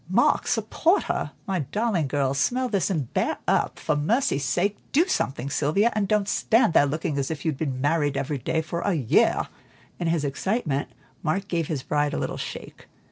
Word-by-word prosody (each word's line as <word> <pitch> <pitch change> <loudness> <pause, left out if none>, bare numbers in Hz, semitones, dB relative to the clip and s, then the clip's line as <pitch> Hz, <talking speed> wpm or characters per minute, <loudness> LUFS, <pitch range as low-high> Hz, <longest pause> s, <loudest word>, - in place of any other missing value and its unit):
Mark, - - +3
support 350 +5 +2
her! - - -2 0.2
My 190 -2 -1
darling 190 - 0
girl, 135 -1 0
smell 250 - 0
this 200 -3 +1
and 155 -10 -2
bear - - 0
up. - - +1
For 150 - -1
mercy 165 - +1
sake 175 +10 0 0.2
do 315 +6 +4
something, 135 - -1
Sylvia, 175 +12 +2
and 210 -2 0
don't 210 -1 +1
stand 225 -3 +3
there 145 - +5
looking 150 0 -2
as 135 - -1
if 155 -2 -5
you'd 155 -4 -1
been 135 -5 -2
married 145 0 +1
every 140 0 -2
day 160 +5 -1
for 170 +2 -4
a 200 - +1
year." 130 -8 +2 0.5
In 175 - -1
his 165 -3 +1
excitement, 145 - -1 0.3
Mark 190 +5 -1
gave 170 -4 -1
his 145 -5 -3
bride 145 0 0
a - - -1
little - - -3
shake. - - -8
160 Hz, 190 wpm, -25 LUFS, 145-200 Hz, 0.5 s, there